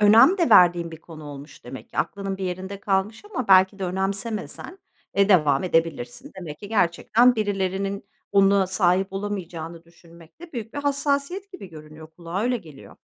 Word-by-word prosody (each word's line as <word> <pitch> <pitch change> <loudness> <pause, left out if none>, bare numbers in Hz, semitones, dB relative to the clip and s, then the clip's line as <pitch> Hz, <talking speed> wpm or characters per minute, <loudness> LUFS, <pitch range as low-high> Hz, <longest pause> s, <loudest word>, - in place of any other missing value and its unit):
Önem 225 - +6
de 340 - +2
verdiğin 175 -1 +6
bir 160 -1 -11
konu 160 -2 -12
olmuş 145 0 -11
demek 130 +2 -9
ki. - - -8
Aklının 195 -1 -2
bir 190 - -5
yerinde 190 +2 -5
kalmış 200 - -1
ama 255 - -4
belki 190 +1 +5
de 190 - -3
önemsemesen, 195 - -4 0.4
eee, 200 +1 +3
devam 150 -6 +4
edebilirsin. 165 -8 -1
Demek 150 -4 -8
ki 205 - -10
gerçekten 220 +5 +3
birilerinin 195 -1 -2 0.3
buna 195 -1 +4
sahip 190 0 +1
olamayacağını 170 -5 -5
düşünmek 170 - -19
de 340 -2 -12
büyük 230 -1 -6
bir - - -3
hassasiyet 285 +7 -1
gibi 285 - -10
görünüyor, 155 0 -12
kulağa 175 +2 -4
öyle 250 +1 +1
geliyor. 155 -9 -13
190 Hz, 165 wpm, -24 LUFS, 170-210 Hz, 0.4 s, Önem